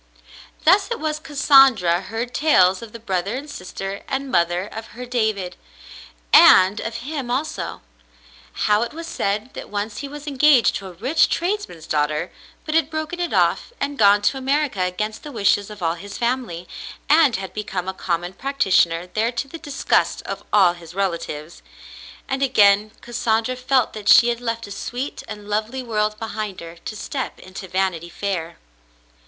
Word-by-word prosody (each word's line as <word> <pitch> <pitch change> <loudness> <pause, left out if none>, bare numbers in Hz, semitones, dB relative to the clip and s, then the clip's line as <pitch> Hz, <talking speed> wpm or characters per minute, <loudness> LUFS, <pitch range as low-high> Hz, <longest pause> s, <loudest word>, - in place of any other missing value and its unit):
Thus 390 +6 +5
it 470 - -3
was 305 0 -2
Cassandra 270 - +4
heard 225 +5 -5
tales 190 -12 +4
of 230 -2 -9
the 230 - -8
brother 195 0 -2
and 280 +3 -6
sister 195 -5 -6
and 270 0 -3
mother 175 0 +1
of 225 +2 -8
her 250 - -6
David, 220 -7 -1 0.8
and 190 +3 +7
of 230 0 -5
him 280 -4 -4
also. 255 - -3 0.8
How 210 0 +3
it 235 - -3
was 335 +1 -6
said 215 -3 -2
that - - -8
once 205 +1 -4
he 280 - -5
was 295 +1 -9
engaged 285 -3 +4
to 195 - -9
a 185 - -10
rich 255 - +2
tradesman's 350 - -2
daughter 150 +2 -1 0.3
but 310 - -3
had 320 -2 +2
broken 315 +2 -4
it 350 -1 -2
off - - +1
and 285 +1 -2
gone 205 -1 +5
to 270 +6 +1
America 275 -5 0
against 210 +4 -2
the 295 - -9
wishes 205 -3 +1
of 210 -3 -9
all 165 0 +1
his 195 +4 -9
family, 235 -8 -2 0.4
and 295 -5 +5
had 190 -1 -5
become 190 -3 -4
a 190 - -2
common 175 -1 -3
practitioner 190 -10 +1
there 220 +6 -1
to 250 +3 -3
the 330 +4 -9
disgust 290 -2 0
of - - -6
all 190 -4 +5
his 170 -1 -13
relatives; 170 -4 -3 0.7
and 270 0 -2
again 210 -5 +4
Cassandra 235 0 -1
felt 255 -1 +1
that 210 -2 -3
she 240 - +8
had 235 0 -2
left 230 -1 -3
a 200 - -11
sweet 250 +7 -5
and 210 -1 -8
lovely 220 +5 -2
world 215 -2 -1
behind 215 -3 -5
her 170 0 -10
to 215 - -5
step 265 +5 -5
into 185 +1 -9
"Vanity 180 -2 -1
Fair." 175 -3 -4
215 Hz, 170 wpm, -22 LUFS, 190-270 Hz, 0.8 s, she